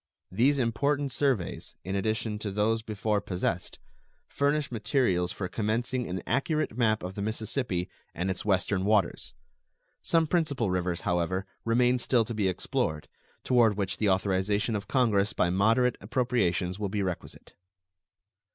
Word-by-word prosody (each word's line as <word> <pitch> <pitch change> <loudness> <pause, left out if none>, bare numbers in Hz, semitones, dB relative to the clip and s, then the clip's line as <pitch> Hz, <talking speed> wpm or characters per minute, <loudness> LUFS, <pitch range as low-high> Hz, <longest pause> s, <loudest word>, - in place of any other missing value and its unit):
These 130 +9 +3
important 140 +4 0
surveys, 125 -7 -1
in 95 +2 -3
addition 110 +1 -1
to 105 - -3
those 105 +3 +1
before 105 -1 -1
possessed, 90 -2 -2 0.5
furnish 145 0 0
materials 105 -6 +1
for 95 - -4
commencing 120 +5 -1
an 90 -1 -4
accurate 140 0 0
map 110 -4 +2
of 90 +1 -5
the 100 - -5
Mississippi 110 -3 -2 0.3
and 90 +3 -1
its 95 - -4
western 95 -1 +1
waters. 105 -2 +1 0.7
Some 165 -1 +2
principal 145 - 0
rivers, 90 -1 -1
however, 90 +2 0 0.2
remain 125 +2 +3
still 120 -1 +2
to 115 - -5
be 105 -3 0
explored, 80 -4 -2 0.3
toward 115 -5 +3
which 95 -3 -1
the 105 - +1
authorization 100 +4 +1
of 100 -1 -4
Congress 110 -5 +2
by 90 - +1
moderate 115 +6 +2
appropriations 100 -5 0
will 100 -2 -2
be 100 0 -1
requisite. 90 -2 -6
105 Hz, 140 wpm, -28 LUFS, 95-125 Hz, 0.7 s, These